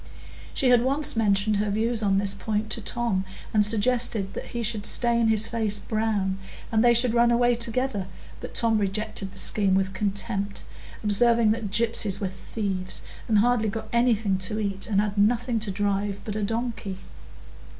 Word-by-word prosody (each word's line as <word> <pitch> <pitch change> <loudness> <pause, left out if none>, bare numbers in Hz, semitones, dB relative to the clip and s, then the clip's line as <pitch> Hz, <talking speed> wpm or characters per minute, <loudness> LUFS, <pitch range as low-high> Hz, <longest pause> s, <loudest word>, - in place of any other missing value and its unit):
She 265 - +1
had 245 -1 +5
once 275 +3 +1
mentioned 210 -1 +1
her 210 +1 -1
views 225 +3 0
on 195 -2 +2
this 200 0 +2
point 215 0 -3
to 230 - -2
Tom 215 -2 -1 0.3
and 210 -1 +4
suggested 220 -1 +1
that - - -6
he 235 -1 -5
should 215 -2 0
stain 235 -1 +4
his 220 0 +4
face 220 -3 +2
brown, 205 -3 -1 0.3
and 220 0 +2
they 240 - +6
should 235 0 +3
run 235 0 +4
away 240 +1 +3
together; 235 -3 -1 0.3
but - - -9
Tom 225 -2 +2
rejected 195 -1 -3
the 195 - -14
scheme 195 0 +2
with 190 0 0
contempt, 200 +1 -2 0.4
observing 225 +2 +3
that 220 -2 -2
gypsies 210 -2 0
were 195 - -2
thieves, 190 -1 -5 0.2
and 220 - +2
hardly 225 0 +2
got 220 +2 -6
anything 225 -5 +2
to 190 +3 -3
eat 195 -2 -2
and 200 -3 +1
had 205 0 -1
nothing 235 +2 +2
to 215 -1 -3
drive 200 0 -1
but 210 - -4
a 215 - -2
donkey. 225 -2 -3
215 Hz, 175 wpm, -25 LUFS, 200-235 Hz, 0.4 s, they